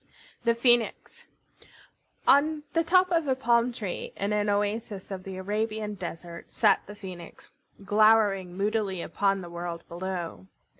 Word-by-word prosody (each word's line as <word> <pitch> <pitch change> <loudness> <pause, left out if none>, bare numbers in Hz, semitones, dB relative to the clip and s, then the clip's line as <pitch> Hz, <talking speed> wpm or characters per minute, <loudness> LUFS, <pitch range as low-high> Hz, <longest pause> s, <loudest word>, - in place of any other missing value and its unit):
THE 235 0 +3
PHOENIX 240 -1 +1 1.0
On 300 +2 +4
the 330 - +2
top 365 +2 +4
of 330 -3 +2
a 265 - +2
palm 240 -1 +2
tree, 210 -6 -5
in 200 +2 -1
an 210 0 +1
oasis 205 -1 -2
of 190 -1 -5
the 190 -1 -6
Arabian 210 +2 -2
desert, 170 -2 -7
sat 210 -4 +3
the 205 - -9
Phoenix, 185 -4 -10 0.3
glowering 205 -3 +3
moodily 200 -3 -1
upon 195 -1 0
the 175 - -8
world 170 -1 -5
below. 170 - -5
205 Hz, 140 wpm, -27 LUFS, 185-230 Hz, 1.0 s, On